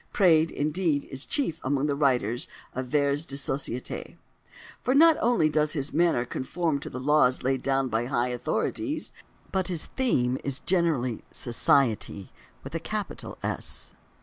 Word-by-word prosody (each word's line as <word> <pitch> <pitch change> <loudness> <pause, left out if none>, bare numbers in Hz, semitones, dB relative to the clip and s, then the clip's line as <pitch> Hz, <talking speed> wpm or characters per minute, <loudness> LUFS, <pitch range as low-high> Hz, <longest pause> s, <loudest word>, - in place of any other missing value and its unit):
Praed, 165 -5 +4
indeed, 150 0 0
is 135 +1 -3
the - - -26
chief 215 - 0
among 135 +1 +1
writers 130 -6 +1 0.3
of 130 0 -4
"vers 145 +2 +1
de 140 - -6
société," 135 -2 -3 0.6
for 255 - +1
not 325 +2 +7
only 235 -9 +3
does 150 0 +1
his 145 -3 -2
manner 165 -7 +2
conform 150 +4 -2
to - - -7
the - - -7
laws 130 -2 +3
laid 130 0 +1
down 135 -1 +1
by 115 0 0
high 125 -1 0
authorities, 300 - -2 0.4
but 190 -2 0
his 175 -4 -2
theme 130 - +1
is 140 0 -2
generally 160 -10 0
"Society" 115 -5 +1 0.3
with - - -8
a - - -1
capital - - -5
S. - - -3
140 Hz, 150 wpm, -27 LUFS, 130-165 Hz, 0.6 s, not